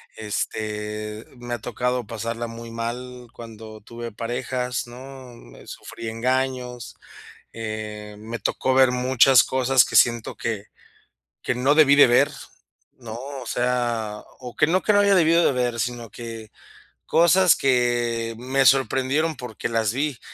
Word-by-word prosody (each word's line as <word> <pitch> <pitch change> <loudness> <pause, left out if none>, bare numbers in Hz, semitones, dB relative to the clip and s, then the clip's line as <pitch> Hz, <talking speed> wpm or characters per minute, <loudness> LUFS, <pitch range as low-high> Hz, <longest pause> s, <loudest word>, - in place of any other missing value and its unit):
Este, 105 0 -4
me 120 0 -6
ha - - -8
tocado 125 +1 -2
pasarla 115 +1 -4
muy 115 0 -9
mal, 125 +2 -6
cuando 110 -2 -11
tuve 115 +1 -8
parejas, 125 +2 -3
¿no?, 130 +1 -11
me - - -16
sufrí 115 - -9
engaños. 125 +1 -2 0.6
Eh, 105 -2 -6
me 115 +2 -6
tocó 130 +2 -1
ver 130 -1 +5
muchas 125 0 +5
cosas, 130 -1 +3
que - - -2
siento 120 -1 +3
que 105 -3 -4 0.8
que 125 - -1
no 130 +4 +2
debí 150 -3 +6
de 145 - +8
ver, 135 +5 +4 0.6
¿no? 120 -4 -11 0.3
O - - -8
sea, 120 -4 -1 0.2
o 125 -2 -10
que - - +4
no 185 +4 +1
que 210 - +2
no 205 - +5
haya 200 -1 +4
debido 170 -1 +4
de - - +3
ver, 125 -2 -1
sino 120 -1 -3
que 115 -2 -9 0.6
cosas 170 +1 +5
que 120 -3 0
me 130 +3 0
sorprendieron, 135 +4 +2
porque 120 -2 -6
las 115 -2 0
vi. 140 -1 -2
120 Hz, 145 wpm, -23 LUFS, 115-130 Hz, 0.8 s, de